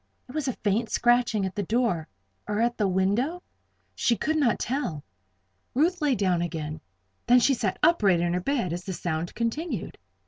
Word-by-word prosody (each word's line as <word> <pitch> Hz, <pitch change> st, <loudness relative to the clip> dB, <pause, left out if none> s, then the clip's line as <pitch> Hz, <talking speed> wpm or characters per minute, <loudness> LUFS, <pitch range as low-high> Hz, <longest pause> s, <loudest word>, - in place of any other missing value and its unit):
It -, -, -11 dB
was 305 Hz, -2 st, -2 dB
a 260 Hz, -, 0 dB
faint 215 Hz, +2 st, -1 dB
scratching 240 Hz, -4 st, +2 dB
at 190 Hz, -, -4 dB
the 205 Hz, -, -2 dB
door, 200 Hz, -6 st, 0 dB, 0.4 s
or 210 Hz, 0 st, -1 dB
at 235 Hz, +1 st, +1 dB
the 210 Hz, -, +1 dB
window? 205 Hz, -, 0 dB, 0.5 s
She 235 Hz, -, +1 dB
could 315 Hz, -, 0 dB
not 275 Hz, -8 st, +2 dB
tell. 215 Hz, -, -2 dB, 0.7 s
Ruth 340 Hz, +6 st, +2 dB
lay 290 Hz, -3 st, +2 dB
down 185 Hz, -4 st, +1 dB
again; 155 Hz, -3 st, -4 dB, 0.5 s
then 245 Hz, +1 st, +7 dB
she 270 Hz, +3 st, +4 dB
sat 205 Hz, -6 st, -1 dB
upright 210 Hz, -, +4 dB
in 170 Hz, 0 st, 0 dB
her 180 Hz, -, 0 dB
bed 235 Hz, -, -1 dB
as 175 Hz, +1 st, -4 dB
the 190 Hz, -, -4 dB
sound 170 Hz, -1 st, -3 dB
continued. 235 Hz, -, -3 dB
220 Hz, 180 wpm, -26 LUFS, 180-255 Hz, 0.7 s, then